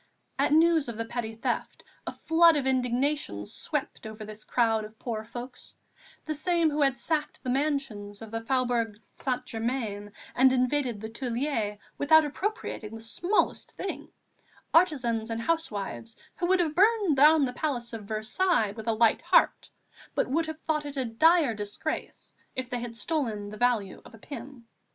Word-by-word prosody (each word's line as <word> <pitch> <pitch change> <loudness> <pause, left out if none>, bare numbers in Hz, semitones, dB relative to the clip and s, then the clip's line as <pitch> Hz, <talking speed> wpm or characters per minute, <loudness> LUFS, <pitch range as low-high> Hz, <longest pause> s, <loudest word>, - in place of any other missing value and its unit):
At - - +3
news 320 -3 +4
of 230 - -6
the 230 - -2
petty 225 -1 -4
theft, 225 - -3 0.2
a - - -1
flood 330 -1 +4
of 275 - -1
indignation 255 - 0
swept 295 - -4
over 220 0 -8
this 215 0 -10
crowd 225 -2 +1
of 215 +1 -11
poor 220 -3 -4
folks, 240 +3 -8 0.5
the 310 - -2
same 330 +1 +1
who 295 +1 -1
had 275 -2 +3
sacked 305 -2 -2
the 255 - -1
mansions 265 -8 -2
of 220 - -10
the 225 0 -3
Faubourg 235 -3 0
Saint 255 -1 -2
Germain 225 -4 -3 0.2
and 260 +1 +5
invaded 255 -2 +1
the 220 - -5
Tuileries 230 -3 -2 0.2
without 315 +2 +6
appropriating 290 - -4
the - - -7
smallest 345 - 0
thing, 390 - -5 0.6
artisans 245 -10 +3
and 225 0 -2
housewives, 205 - -3 0.2
who 345 - 0
would 370 0 +4
have 315 -3 0
burned 405 -2 +4
down 300 +1 +6
the 250 - -4
Palace 245 -5 -3
of 220 -2 -6
Versailles 220 - +1
with 220 0 -8
a 225 - +3
light 220 0 +3
heart, - - +3 0.5
but - - +1
would 320 +5 0
have 315 0 -6
thought 305 -2 -1
it 285 -1 -6
a 260 - 0
dire 300 +4 +4
disgrace 205 -1 -5 0.2
if 260 0 -4
they 245 - -1
had 235 -1 -6
stolen 225 -10 -2
the - - -7
value 230 -5 0
of - - -14
a - - -14
pin. 245 +1 -9
250 Hz, 170 wpm, -28 LUFS, 225-300 Hz, 0.6 s, without